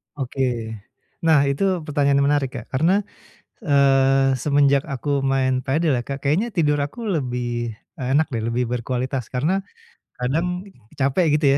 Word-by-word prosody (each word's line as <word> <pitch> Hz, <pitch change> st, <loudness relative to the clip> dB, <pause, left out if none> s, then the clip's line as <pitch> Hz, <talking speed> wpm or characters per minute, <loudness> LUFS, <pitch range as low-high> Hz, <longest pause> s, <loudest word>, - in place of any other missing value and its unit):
Oke. 125 Hz, -4 st, -2 dB, 0.6 s
Nah, 155 Hz, -3 st, +5 dB
itu 170 Hz, +6 st, 0 dB
pertanyaan 140 Hz, -2 st, +2 dB
yang -, -, +2 dB
menarik, 140 Hz, -3 st, +1 dB
Kak. 120 Hz, -3 st, -6 dB
Karena, 175 Hz, +9 st, +2 dB, 0.6 s
eee, 135 Hz, -1 st, +3 dB
semenjak 140 Hz, 0 st, +2 dB
aku 140 Hz, +1 st, -1 dB
main 135 Hz, -1 st, +1 dB
padel 150 Hz, +4 st, +1 dB
ya. -, -, -5 dB
Kak, 140 Hz, 0 st, -6 dB
kayaknya 165 Hz, +12 st, +1 dB
tidur 150 Hz, -8 st, +1 dB
aku 145 Hz, +12 st, -4 dB
lebih, 120 Hz, -, -2 dB, 0.2 s
eee, 125 Hz, -, -2 dB
enak 155 Hz, -1 st, +1 dB
deh, 115 Hz, -, -1 dB
lebih 120 Hz, +2 st, 0 dB
berkualitas, 125 Hz, +2 st, -3 dB
karena 155 Hz, +10 st, 0 dB, 0.6 s
kadang 165 Hz, +9 st, -1 dB, 0.3 s
capek, 145 Hz, +3 st, +2 dB
gitu 150 Hz, 0 st, +1 dB
140 Hz, 145 wpm, -22 LUFS, 130-150 Hz, 0.6 s, Nah